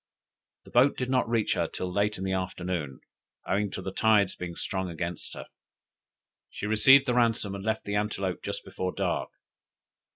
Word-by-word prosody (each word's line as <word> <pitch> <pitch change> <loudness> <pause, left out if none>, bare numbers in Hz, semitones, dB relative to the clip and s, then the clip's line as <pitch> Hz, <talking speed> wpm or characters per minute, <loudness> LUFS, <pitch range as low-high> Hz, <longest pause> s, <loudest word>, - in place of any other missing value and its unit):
The - - -15
boat 130 +4 +4
did 130 0 -2
not 130 -3 +2
reach 115 -3 +1
her - - 0
till 90 -1 -5
late 105 +2 +1
in 95 - -5
the 95 - -1
afternoon, 90 -6 -3 0.5
owing 105 +1 +1
to 95 - -6
the 95 - -4
tide's 105 -3 +3
being 85 -1 -6
strong 95 +1 -3
against 85 0 -5
her. - - -7 1.0
She - - -6
received 135 +6 +6
the 125 - +1
ransom 115 -4 +2
and 100 0 -6
left 110 +1 -1
the 100 - -3
Antelope 105 -3 -1
just - - -5
before 90 0 -4
dark. - - -1
100 Hz, 175 wpm, -28 LUFS, 90-110 Hz, 1.0 s, received